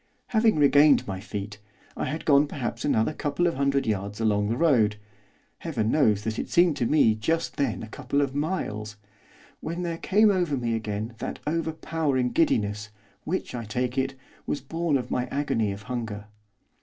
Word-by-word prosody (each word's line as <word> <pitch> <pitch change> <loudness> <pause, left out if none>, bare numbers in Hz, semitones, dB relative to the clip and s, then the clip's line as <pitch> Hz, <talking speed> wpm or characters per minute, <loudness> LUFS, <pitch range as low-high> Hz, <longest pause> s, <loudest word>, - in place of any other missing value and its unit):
Having 220 -1 +3
regained 145 0 +5
my 95 -2 -4
feet, 105 +1 -6 0.4
I - - -2
had 155 +5 -4
gone 145 0 +5
perhaps 120 -4 -4
another 115 -1 +1
couple 145 +4 -1
of 170 - +2
hundred 140 0 +1
yards 100 -1 -2
along 105 -2 +1
the 115 - -1
road 120 -10 +3 0.6
Heaven 120 -9 -1
knows 110 -9 +3
that 110 +1 -3
it - - -4
seemed 175 -3 +4
to 120 - +1
me 140 -7 +4
just 160 +10 -1
then 140 - -1
a - - -7
couple 140 +4 -2
of 140 -2 0
miles! 110 - -3 0.6
when 170 +2 -4
there 165 -1 -3
came 210 +2 +4
over 175 -7 0
me 120 -2 -1
again 110 0 -3
that - - -4
overpowering 155 -5 -1
giddiness 105 -9 +1 0.4
which, 185 +4 -3
I 120 -1 -4
take 125 +4 -2
it, 135 0 -1 0.3
was 145 - -1
born 165 +2 -1
of 125 - -6
my 125 - 0
agony 115 -7 0
of 100 +1 -7
hunger. 110 -4 -5
130 Hz, 175 wpm, -26 LUFS, 110-155 Hz, 0.6 s, regained